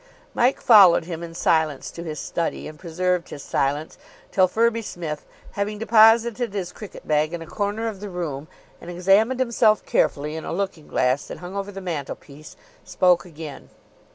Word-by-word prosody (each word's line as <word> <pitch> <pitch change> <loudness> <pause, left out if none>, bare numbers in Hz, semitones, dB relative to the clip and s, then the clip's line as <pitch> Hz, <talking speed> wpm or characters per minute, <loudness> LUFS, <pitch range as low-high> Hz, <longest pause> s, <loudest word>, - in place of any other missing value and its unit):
Mike 250 +3 +2
followed 195 -8 +7
him 165 -1 -6
in 165 -1 -8
silence 160 -5 +1
to 170 - -8
his 155 -3 -5
study, 170 - -3
and 155 -1 -11
preserved 180 +1 -1
his 140 - -8
silence 145 +3 -2 0.3
till 185 -1 +4
Firby 230 +4 +1
Smith, 165 -7 -6 0.2
having 205 +1 -3
deposited 225 +1 +4
his 185 -3 -3
cricket 210 -4 -11
bag 155 +1 +1
in 170 - -7
a - - -11
corner 205 +5 -2
of 210 -4 -5
the 205 0 -7
room 160 -5 -5 0.3
and 170 - -9
examined 195 +8 +2
himself 230 -4 +2
carefully 150 +1 0
in 160 - -5
a - - -5
looking 180 -4 -3
glass 130 +2 0
that - - -7
hung 180 +2 -9
over 200 0 -4
the 195 -1 -8
mantelpiece, 150 -3 -7 0.3
spoke 180 -1 +2
again. 160 -4 -10
180 Hz, 175 wpm, -23 LUFS, 155-210 Hz, 0.3 s, followed